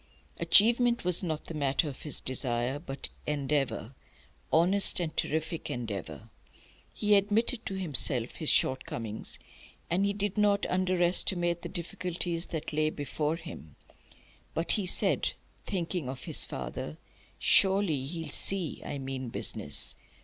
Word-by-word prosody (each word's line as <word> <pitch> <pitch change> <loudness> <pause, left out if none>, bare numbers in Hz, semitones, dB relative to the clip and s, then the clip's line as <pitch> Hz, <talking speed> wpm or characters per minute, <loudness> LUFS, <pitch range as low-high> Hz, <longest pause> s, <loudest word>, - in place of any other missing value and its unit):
Achievement 235 +1 +5
was 180 -1 +5
not 160 -5 -3
the - - -7
matter 145 +1 0
of 135 -3 -7
his 150 - +1
desire; 130 +1 -1
but 140 -3 -3 0.2
endeavour, 140 -4 -1 0.6
honest 185 +6 +5
and 165 -3 -3
terrific 160 +1 -2
endeavour. 100 - -6 0.6
He 210 0 +1
admitted 215 +4 +2
to 195 - -3
himself 140 -9 +1
his 155 - +1
shortcomings, 115 -4 0 0.5
and 180 +3 +2
he 200 0 +1
did 205 0 -2
not 205 -1 +3
under 185 0 0
estimate 175 -1 +1
the 170 - -6
difficulties 175 -1 -2
that 160 -1 -4
lay 155 0 +2
before 150 +1 -2
him; 160 - -10 0.8
but 165 +1 0
he 200 -4 0
said, - - +1 0.3
thinking 175 -6 -2
of 130 0 -7
his - - +3
father: 65 +4 -6 0.4
"Surely 190 -8 +3
he'll 165 +1 -5
see 190 -5 -1
I - - -5
mean 130 -2 -5
business! - - +1
165 Hz, 135 wpm, -29 LUFS, 135-185 Hz, 0.8 s, Achievement